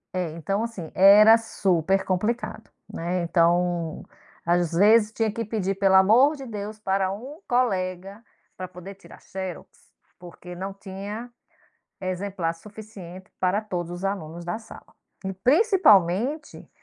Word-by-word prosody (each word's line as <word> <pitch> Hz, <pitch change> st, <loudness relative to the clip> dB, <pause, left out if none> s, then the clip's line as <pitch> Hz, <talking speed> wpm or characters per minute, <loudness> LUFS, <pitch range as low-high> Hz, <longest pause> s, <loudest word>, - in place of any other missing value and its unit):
É, 180 Hz, -2 st, -1 dB
então, 195 Hz, +6 st, -2 dB
assim, 200 Hz, -9 st, -6 dB
era 210 Hz, +4 st, +8 dB
super 190 Hz, -4 st, 0 dB
complicado, 210 Hz, +6 st, -2 dB, 0.2 s
né. 175 Hz, +2 st, -2 dB
Então, 170 Hz, 0 st, +1 dB, 0.4 s
às 175 Hz, 0 st, +1 dB
vezes, 210 Hz, +4 st, +5 dB
tinha 220 Hz, -1 st, -1 dB
que 230 Hz, +2 st, -4 dB
pedir: 205 Hz, -3 st, -2 dB
"Pelo 195 Hz, 0 st, +3 dB
o -, -, +9 dB
amor 235 Hz, +10 st, +5 dB
de 275 Hz, -2 st, -9 dB
Deus" 210 Hz, -2 st, -6 dB
pra 195 Hz, -2 st, 0 dB
um 260 Hz, +10 st, -8 dB
colega, 195 Hz, -4 st, -1 dB, 0.3 s
pra 185 Hz, -, -6 dB
poder 180 Hz, +2 st, -10 dB
tirar 195 Hz, -, -16 dB
xerox, 190 Hz, -3 st, -7 dB, 0.5 s
porque 180 Hz, 0 st, -11 dB
não 190 Hz, +2 st, -5 dB
tinha 200 Hz, +4 st, -8 dB, 0.7 s
exemplar 185 Hz, -2 st, -3 dB
suficiente 190 Hz, -1 st, -12 dB
para 185 Hz, +2 st, +1 dB
todos 175 Hz, -5 st, -5 dB
os 175 Hz, +2 st, -5 dB
alunos 170 Hz, -3 st, -4 dB
da 175 Hz, +5 st, -3 dB
sala. 225 Hz, -, -14 dB, 0.3 s
E 190 Hz, -, -3 dB
principalmente 270 Hz, -, +2 dB
195 Hz, 135 wpm, -24 LUFS, 180-215 Hz, 0.7 s, o